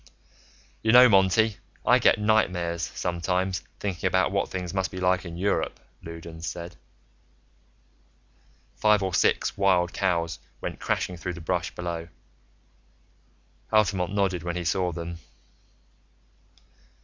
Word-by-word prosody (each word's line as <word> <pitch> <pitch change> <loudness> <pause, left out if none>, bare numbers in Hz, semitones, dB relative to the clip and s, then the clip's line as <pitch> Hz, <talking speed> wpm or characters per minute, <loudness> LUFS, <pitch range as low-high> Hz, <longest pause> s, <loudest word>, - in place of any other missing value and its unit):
"You 110 - +2
know, 125 +1 +10
Monty, 100 +1 +3 0.3
I - - +5
get - - +4
nightmares, 90 -6 +1
sometimes, 90 +3 -2 0.2
thinking 95 -3 -2
about 95 +1 +2
what 100 0 0
things 90 -2 -5
must 95 -2 0
be 95 - -7
like 90 0 +1
in 85 -1 -7
Europe," 100 +3 -1 0.2
Loudons 85 0 -8
said. 85 0 -6 2.0
Five 105 -2 +3
or 95 -1 -2
six 85 - +2
wild 90 -3 +3
cows 85 -4 0 0.2
went - - -5
crashing 90 - -2
through 90 +1 -4
the 85 - -8
brush 90 +1 -2
below. 85 -1 -4 1.6
Altamont 95 -4 +2
nodded 95 -4 0
when 85 +1 -4
he 90 - -3
saw 90 +1 0
them. 85 0 -6
90 Hz, 125 wpm, -26 LUFS, 85-95 Hz, 2.0 s, know